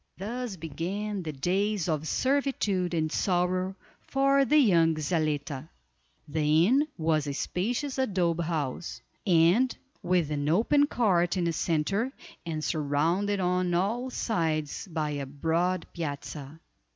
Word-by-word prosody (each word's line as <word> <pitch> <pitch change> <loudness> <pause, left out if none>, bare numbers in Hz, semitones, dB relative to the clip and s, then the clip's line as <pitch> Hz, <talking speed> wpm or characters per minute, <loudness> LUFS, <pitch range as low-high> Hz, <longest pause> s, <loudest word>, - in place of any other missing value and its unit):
Thus 230 +2 -4
began 185 +6 -4
the 160 -3 -4
days 185 +6 0
of 155 -1 -1
servitude 215 - 0
and 155 -1 0
sorrow 185 +1 0 0.3
for 275 0 +2
the 300 +4 +4
young 170 - +4
Zaletta. 155 -2 -2 0.6
The 155 +2 +3
inn 275 +8 +3
was 155 -3 +1
a 140 - -3
spacious 245 - -2
adobe 175 -8 +1
house, 155 -2 -3 0.3
with 180 - +2
an 145 0 -1
open 240 - +4
court 185 - +2
in 180 - +1
the 170 -1 0
center, 190 - 0 0.4
and 155 -2 -3
surrounded 165 +8 0
on 180 -1 +1
all 225 +8 0
sides 160 - -1
by 155 -3 -2
a 140 -2 -4
broad 165 +5 0
piazza. 150 -2 -6
175 Hz, 125 wpm, -28 LUFS, 155-205 Hz, 0.6 s, the